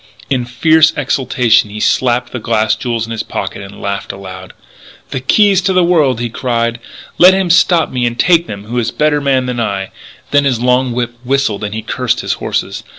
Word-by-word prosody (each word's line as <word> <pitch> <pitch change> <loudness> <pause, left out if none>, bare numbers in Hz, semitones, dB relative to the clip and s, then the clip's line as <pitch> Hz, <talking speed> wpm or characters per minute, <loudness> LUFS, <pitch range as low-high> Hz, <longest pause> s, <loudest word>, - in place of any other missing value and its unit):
In 125 -3 0
fierce 160 +6 +3
exultation 125 -5 +1
he 105 +1 -7
slapped 120 +1 +1
the 125 - -5
glass 110 -1 +1
jewels 115 -2 -3
in 115 - -9
his 115 - -3
pocket - - -5
and 100 0 -11
laughed 100 0 -4
aloud. 95 -1 -10 0.6
"The 130 - -2
keys 195 +8 +3
to 190 +1 0
the 185 -1 +3
world!" 150 -9 +2
he 120 - -2
cried. 115 -1 -2 0.4
"Let 185 +2 +7
him 190 -3 0
stop 175 -1 +3
me 125 -2 0
and 120 0 -4
take 170 +2 +3
them 100 -1 -7
who 120 +3 -3
is 115 - -1
a - - -10
better 150 -1 +1
man 135 -2 +1
than 125 -1 -3
I!" 100 -4 -3 0.4
Then 145 0 +3
his 130 -4 +1
long 125 +1 +1
whip 120 0 -2
whistled 125 -5 -1
and 105 0 -4
he 110 - -5
cursed - - -1
his - - -1
horses. - - -3
125 Hz, 210 wpm, -14 LUFS, 115-145 Hz, 0.6 s, Let